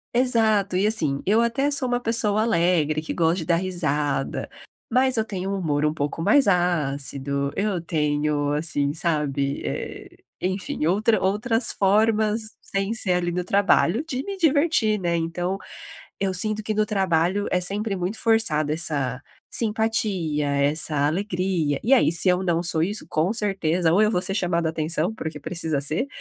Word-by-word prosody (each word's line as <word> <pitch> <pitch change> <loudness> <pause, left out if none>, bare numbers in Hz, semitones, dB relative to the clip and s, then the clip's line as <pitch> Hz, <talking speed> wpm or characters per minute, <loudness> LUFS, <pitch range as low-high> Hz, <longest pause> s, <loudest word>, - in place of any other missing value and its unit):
Exato, 220 -6 +2
e, 195 - +1
assim, 155 -11 +1
eu 215 +4 +3
até 270 +5 0
sou 275 -3 +5
uma 245 0 -1
pessoa 220 -3 +4
alegre, 170 -7 +1
que 155 - -6
gosta 165 0 +1
de 165 - -5
dar 170 - +2
risada, 150 -6 -2 0.4
mas 255 +1 +1
eu 220 - 0
tenho 190 -3 -5
um 200 - -2
humor 150 -5 -1
um 150 - -1
pouco 145 +1 -4
mais 275 - +3
ácido. 140 -6 -1
Eu 195 -3 -2
tenho, 150 -2 -1
assim, 145 -2 0
sabe, 150 -4 -1
eh, - - -7 0.2
enfim 185 -4 -3
outra 210 +5 +1
outras 215 +5 +1
formas 215 +2 +1 0.2
sem 195 +2 -2
ser 210 -5 +2
ali 175 -1 -1
no 180 +1 -3
trabalho, 200 - +1
de 260 -4 -3
me 395 -1 -6
divertir, 285 - +1
né. 170 -2 -1
Então, 175 +3 -3 0.6
eu 195 -1 0
sinto 215 +3 +3
que, 215 +1 -3
no 215 0 +1
trabalho, 190 -1 0
é 180 - +1
sempre 200 +3 +2
muito 185 +4 -3
forçada 200 -11 +1
essa 145 -6 -1 0.3
simpatia, 210 -9 -1
essa 145 +1 +1
alegria. 175 -4 -2
E 245 - 0
aí, 250 -11 +4
se 170 +3 +2
eu 180 0 +2
não 170 -2 0
sou 165 -2 +2
isso, 205 +4 -2
com 160 +6 0
certeza, 185 -6 +1
ou 185 - +3
eu 215 0 +2
vou 180 - 0
ser 190 +1 +1
chamado 175 -4 -1
atenção, 160 +3 -1
porque 160 -8 -7
precisa 160 -1 -2
ser, 155 - +2
180 Hz, 165 wpm, -23 LUFS, 155-215 Hz, 0.6 s, sou